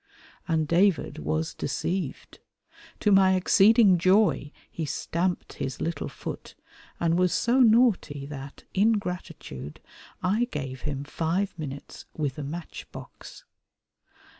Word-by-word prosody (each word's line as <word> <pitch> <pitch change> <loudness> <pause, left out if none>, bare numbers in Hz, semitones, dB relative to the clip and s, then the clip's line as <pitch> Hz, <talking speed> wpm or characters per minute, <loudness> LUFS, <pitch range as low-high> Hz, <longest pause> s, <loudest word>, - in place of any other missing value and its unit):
And 160 -3 +1
David 180 +3 +2
was 80 +2 -2
deceived. 180 -6 -3 0.6
To 210 - +3
my 190 -1 +6
exceeding 195 +1 +5
joy 185 -5 +3 0.2
he 165 - -4
stamped 170 +4 -2
his 130 -2 -5
little 165 +1 -2
foot, - - -8 0.4
and 170 +1 +2
was 180 -1 +3
so 240 +3 +2
naughty 220 - +4
that, 140 -1 -9
in 215 +4 +4
gratitude, 180 - -6 0.4
I 210 +6 +2
gave 135 - -6
him 140 -1 -4
five 165 +6 -1
minutes 140 -2 -7
with 145 -3 -2
a - - -4
matchbox. 165 +4 -9
170 Hz, 115 wpm, -27 LUFS, 145-195 Hz, 0.6 s, my